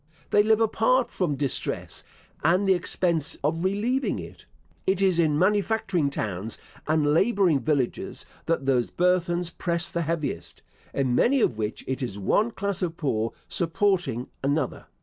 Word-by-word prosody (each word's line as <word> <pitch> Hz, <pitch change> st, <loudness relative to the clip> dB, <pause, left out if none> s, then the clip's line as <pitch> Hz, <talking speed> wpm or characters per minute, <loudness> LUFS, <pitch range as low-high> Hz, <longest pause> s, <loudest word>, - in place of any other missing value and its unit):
They 205 Hz, -, +6 dB
live 220 Hz, +1 st, +3 dB
apart 230 Hz, +3 st, +2 dB
from 170 Hz, -6 st, -1 dB
distress, 140 Hz, -2 st, -2 dB, 0.4 s
and 185 Hz, +4 st, +3 dB
the 190 Hz, -, +6 dB
expense 170 Hz, -3 st, 0 dB
of 160 Hz, +4 st, 0 dB
relieving 220 Hz, +8 st, 0 dB
it. -, -, -10 dB, 0.4 s
It 190 Hz, 0 st, +2 dB
is 190 Hz, -3 st, +3 dB
in 155 Hz, -3 st, +3 dB
manufacturing 195 Hz, -3 st, +1 dB
towns 105 Hz, -4 st, -3 dB, 0.3 s
and 150 Hz, -1 st, +2 dB
labouring 190 Hz, -4 st, +3 dB
villages 130 Hz, 0 st, -1 dB, 0.2 s
that 165 Hz, -5 st, 0 dB
those 125 Hz, -3 st, +2 dB
burthens 175 Hz, -1 st, +1 dB
press 170 Hz, 0 st, -1 dB
the 170 Hz, -, -1 dB
heaviest; 160 Hz, -2 st, -3 dB, 0.3 s
in 130 Hz, -3 st, 0 dB
many 265 Hz, -, +3 dB
of 120 Hz, -, +1 dB
which 105 Hz, 0 st, -3 dB
it 130 Hz, +1 st, -3 dB
is 120 Hz, -6 st, -4 dB
one 205 Hz, -, +2 dB
class 200 Hz, -3 st, -3 dB
of 170 Hz, -2 st, -2 dB
poor 115 Hz, -7 st, -1 dB
supporting 170 Hz, -, 0 dB, 0.2 s
another. 140 Hz, 0 st, -1 dB
170 Hz, 150 wpm, -26 LUFS, 140-195 Hz, 0.4 s, They